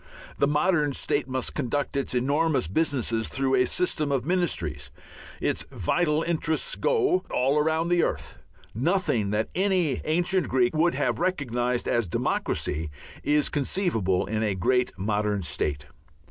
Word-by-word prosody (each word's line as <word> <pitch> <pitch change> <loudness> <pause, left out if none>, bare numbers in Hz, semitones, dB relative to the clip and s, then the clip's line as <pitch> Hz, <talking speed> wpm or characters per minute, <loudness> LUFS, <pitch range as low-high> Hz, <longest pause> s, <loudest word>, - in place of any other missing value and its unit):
The 140 - +4
modern 150 0 +2
state 145 +1 0
must 130 -1 -2
conduct 140 0 -2
its 135 -2 -2
enormous 145 - +1
businesses 115 - 0
through 135 0 -1
a 125 -1 +4
system 155 -3 0
of 135 -3 0
ministries; 170 - -1 0.5
its - - 0
vital 150 - 0
interests 160 -1 -1
go 395 -6 +1
all 135 +4 +2
round 160 +2 0
the 175 -1 +4
earth; - - -3 0.3
nothing 125 - 0
that 105 +2 -1
any 185 -6 +1
ancient 175 +4 +1
Greek 125 +2 +2
would 170 +2 +2
have - - 0
recognized 125 -9 -1
as 120 -4 +1
democracy 80 -1 -1 0.3
is 150 0 +2
conceivable 130 - 0
in 110 0 -2
a 105 -3 0
great 125 +7 +1
modern 105 0 -1
state. 75 -1 -2
140 Hz, 140 wpm, -26 LUFS, 115-165 Hz, 0.5 s, The